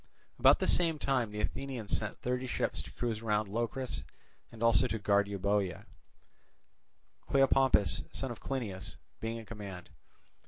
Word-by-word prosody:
About -, -, +7 dB
the -, -, -1 dB
same 165 Hz, -3 st, +3 dB
time 130 Hz, -6 st, +1 dB
the 105 Hz, 0 st, -4 dB
Athenians 125 Hz, -3 st, -2 dB
sent 105 Hz, -1 st, -4 dB
thirty 125 Hz, +1 st, -1 dB
ships -, -, -1 dB
to -, -, -11 dB
cruise 115 Hz, -3 st, -2 dB
round 105 Hz, -2 st, +1 dB
Locris 120 Hz, +5 st, -2 dB, 0.5 s
and 115 Hz, 0 st, -7 dB
also 115 Hz, +2 st, +5 dB
to 115 Hz, -, -2 dB
guard 100 Hz, -1 st, +2 dB
Euboea; 100 Hz, -1 st, -1 dB, 1.4 s
Cleopompus, 135 Hz, -5 st, +4 dB
son 135 Hz, -2 st, -3 dB
of 120 Hz, -, -7 dB
Clinias, 110 Hz, -9 st, -4 dB, 0.2 s
being 115 Hz, +1 st, -3 dB
in 115 Hz, -, -8 dB
command. 100 Hz, -5 st, -8 dB
115 Hz, 145 wpm, -32 LUFS, 105-130 Hz, 1.4 s, About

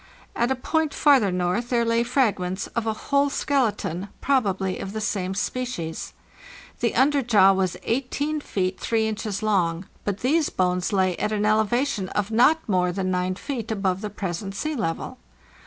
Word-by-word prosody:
At 235 Hz, +1 st, +1 dB
a 265 Hz, -, +1 dB
point 315 Hz, +4 st, -1 dB
farther 270 Hz, -10 st, +4 dB
north 180 Hz, +7 st, -1 dB
there 235 Hz, -2 st, +2 dB
lay 230 Hz, 0 st, +2 dB
fragments 210 Hz, -7 st, 0 dB
of 230 Hz, -1 st, -1 dB
a 220 Hz, -, +1 dB, 0.2 s
whole 280 Hz, 0 st, +4 dB
skeleton, 220 Hz, -, -1 dB
probably 195 Hz, -9 st, 0 dB
of 195 Hz, -, -5 dB
the 220 Hz, -, -3 dB
same 195 Hz, -3 st, -2 dB
species. 205 Hz, -7 st, -3 dB, 0.7 s
The 235 Hz, -2 st, 0 dB
underjaw 240 Hz, -8 st, +4 dB
was 185 Hz, -2 st, 0 dB
18 285 Hz, +5 st, -1 dB
feet 185 Hz, -7 st, -2 dB
3 225 Hz, -1 st, +1 dB
inches 215 Hz, -1 st, -3 dB
long; 180 Hz, -4 st, +1 dB, 0.2 s
but 205 Hz, -1 st, -3 dB
these 300 Hz, +5 st, +2 dB
bones 180 Hz, 0 st, 0 dB
lay 190 Hz, -3 st, +2 dB
at 210 Hz, -, -1 dB
an 210 Hz, -1 st, 0 dB
elevation 215 Hz, 0 st, +1 dB
of 205 Hz, +1 st, -2 dB
not 300 Hz, +8 st, +4 dB
more 180 Hz, -3 st, +2 dB
than 185 Hz, 0 st, -1 dB
g 180 Hz, +1 st, -1 dB
feet 245 Hz, -6 st, -4 dB
above 195 Hz, -3 st, -1 dB
the 210 Hz, -, -3 dB
present 195 Hz, -1 st, -4 dB
sea 310 Hz, +9 st, -2 dB
level. 210 Hz, -, -3 dB
215 Hz, 165 wpm, -24 LUFS, 185-250 Hz, 0.7 s, farther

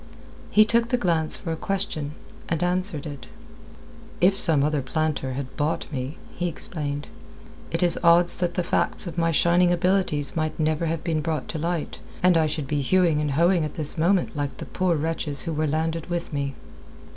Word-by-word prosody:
He 215 Hz, +1 st, +5 dB
took 230 Hz, +1 st, +1 dB
the 250 Hz, -, +2 dB
glance 165 Hz, -7 st, +3 dB
for 170 Hz, -, -5 dB
a -, -, -1 dB
question, 185 Hz, -6 st, -3 dB, 0.4 s
and 165 Hz, 0 st, -1 dB
answered 180 Hz, -4 st, 0 dB
it. 140 Hz, -5 st, -8 dB, 0.9 s
"If 190 Hz, +2 st, +4 dB
some 160 Hz, -7 st, +5 dB
other 150 Hz, -1 st, 0 dB
planter 140 Hz, -1 st, -2 dB
had 130 Hz, 0 st, -6 dB
bought 150 Hz, +2 st, -1 dB
me," 135 Hz, +2 st, -5 dB, 0.2 s
he 175 Hz, -, -2 dB
explained, 145 Hz, -3 st, -1 dB, 0.6 s
"it 165 Hz, +2 st, -1 dB
is 175 Hz, -, +2 dB
odds 175 Hz, +1 st, +6 dB
that 175 Hz, -1 st, -1 dB
the 180 Hz, -, 0 dB
facts -, -, 0 dB
of 175 Hz, -1 st, -5 dB
my 165 Hz, 0 st, +2 dB
shining 175 Hz, +2 st, +3 dB
abilities 175 Hz, -5 st, 0 dB
might 155 Hz, -1 st, -2 dB
never 155 Hz, +1 st, 0 dB
have 165 Hz, 0 st, -3 dB
been 160 Hz, -3 st, -1 dB
brought 160 Hz, -1 st, -3 dB
to 160 Hz, -, -4 dB
light, 170 Hz, 0 st, -3 dB, 0.2 s
and 180 Hz, -1 st, +5 dB
I 160 Hz, -1 st, +3 dB
should 150 Hz, -1 st, -3 dB
be 145 Hz, +1 st, -1 dB
hewing 165 Hz, +1 st, +2 dB
and 150 Hz, -, -1 dB
hoeing 170 Hz, +3 st, +3 dB
at 150 Hz, -, -5 dB
this 150 Hz, -2 st, -1 dB
moment 175 Hz, +3 st, +1 dB
like 145 Hz, -2 st, -3 dB
the -, -, -7 dB
poor 185 Hz, -2 st, 0 dB
wretches 150 Hz, -2 st, -1 dB
who 165 Hz, -, -3 dB
were 155 Hz, 0 st, 0 dB
landed 160 Hz, +2 st, -2 dB
with 175 Hz, -2 st, -4 dB
me." 140 Hz, -1 st, -3 dB
160 Hz, 190 wpm, -24 LUFS, 150-175 Hz, 0.9 s, odds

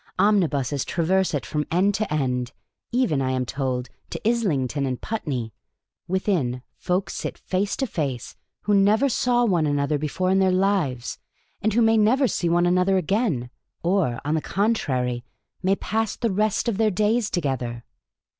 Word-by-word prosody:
Omnibuses 150 Hz, -, +2 dB
traverse 185 Hz, +3 st, +1 dB
it 145 Hz, -, -3 dB
from 150 Hz, -1 st, -2 dB
erd 190 Hz, +4 st, +3 dB
to 210 Hz, -2 st, -2 dB
end, 125 Hz, -4 st, -1 dB, 0.4 s
even, 240 Hz, -, +1 dB
I 130 Hz, -, 0 dB
am 130 Hz, -1 st, 0 dB
told, 130 Hz, -1 st, -2 dB, 0.2 s
to -, -, -4 dB
Islington 145 Hz, -, 0 dB
and 125 Hz, -1 st, -3 dB
Putney; 130 Hz, -, -3 dB, 0.5 s
within, 175 Hz, -, 0 dB, 0.2 s
tolk 180 Hz, +1 st, 0 dB
sit -, -, -4 dB
face 195 Hz, +2 st, -1 dB
to 270 Hz, -, 0 dB
face 140 Hz, -, -3 dB, 0.3 s
who 210 Hz, -, 0 dB
never 210 Hz, +7 st, +4 dB
saw 245 Hz, 0 st, +2 dB
one 175 Hz, -8 st, +2 dB
another 145 Hz, 0 st, 0 dB
before 165 Hz, +5 st, -1 dB
in 190 Hz, -, +3 dB
their 190 Hz, -1 st, +3 dB
lives, 185 Hz, -10 st, 0 dB, 0.4 s
and 215 Hz, +2 st, +1 dB
who 235 Hz, +2 st, +4 dB
may 225 Hz, 0 st, +4 dB
never 250 Hz, +6 st, +4 dB
see 175 Hz, -6 st, -1 dB
one 175 Hz, +1 st, +3 dB
another 180 Hz, +2 st, +3 dB
again, 180 Hz, -, 0 dB, 0.3 s
or, 170 Hz, -9 st, +1 dB
on 150 Hz, -, 0 dB
the 160 Hz, -, +1 dB
con 205 Hz, +8 st, +1 dB
trary, 125 Hz, -, -1 dB, 0.4 s
may 190 Hz, +1 st, +2 dB
pass 220 Hz, +1 st, -1 dB
the 230 Hz, -3 st, -1 dB
rest 210 Hz, +4 st, +1 dB
of 225 Hz, -5 st, 0 dB
their 220 Hz, -1 st, +4 dB
days 215 Hz, +3 st, +1 dB
together." 125 Hz, -8 st, -2 dB
180 Hz, 165 wpm, -24 LUFS, 135-210 Hz, 0.5 s, never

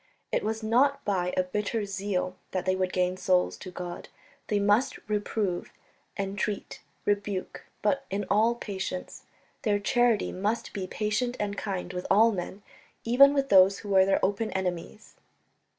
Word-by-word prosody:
It -, -, 0 dB
was 220 Hz, +1 st, -2 dB
not 270 Hz, +6 st, +2 dB
by 180 Hz, -3 st, 0 dB
a 185 Hz, -, +4 dB
bitter 210 Hz, +3 st, -2 dB
zeal 195 Hz, -2 st, -2 dB, 0.2 s
that 185 Hz, -1 st, -1 dB
they 185 Hz, 0 st, +2 dB
would 185 Hz, -1 st, -1 dB
gain 180 Hz, 0 st, 0 dB
souls 185 Hz, -1 st, +2 dB
to 185 Hz, -, -9 dB
God; 175 Hz, -1 st, -7 dB, 0.4 s
they 210 Hz, -, +1 dB
must 205 Hz, +6 st, +2 dB
reprove, 205 Hz, -3 st, -2 dB, 0.5 s
entreat, 200 Hz, +1 st, -3 dB, 0.2 s
rebuke, 205 Hz, -2 st, -2 dB, 0.2 s
but 275 Hz, +7 st, +1 dB
in 200 Hz, +1 st, -2 dB
all 225 Hz, +3 st, +3 dB
patience; 190 Hz, -5 st, -5 dB, 0.4 s
their 210 Hz, -3 st, +2 dB
charity 235 Hz, +1 st, +2 dB
must 210 Hz, +5 st, -2 dB
be 190 Hz, -2 st, -4 dB
patient 215 Hz, +5 st, -1 dB
and 205 Hz, -1 st, -2 dB
kind 185 Hz, -3 st, -4 dB
with 180 Hz, 0 st, -4 dB
all 225 Hz, +3 st, +6 dB
men, 195 Hz, +1 st, -5 dB, 0.4 s
even 265 Hz, +4 st, +7 dB
with 275 Hz, -1 st, 0 dB
those 195 Hz, 0 st, +6 dB
who 205 Hz, -, -9 dB
were 190 Hz, -1 st, +5 dB
their 195 Hz, -, +3 dB
open 205 Hz, +3 st, -1 dB
enemies. 185 Hz, +2 st, -4 dB
200 Hz, 155 wpm, -28 LUFS, 185-220 Hz, 0.5 s, even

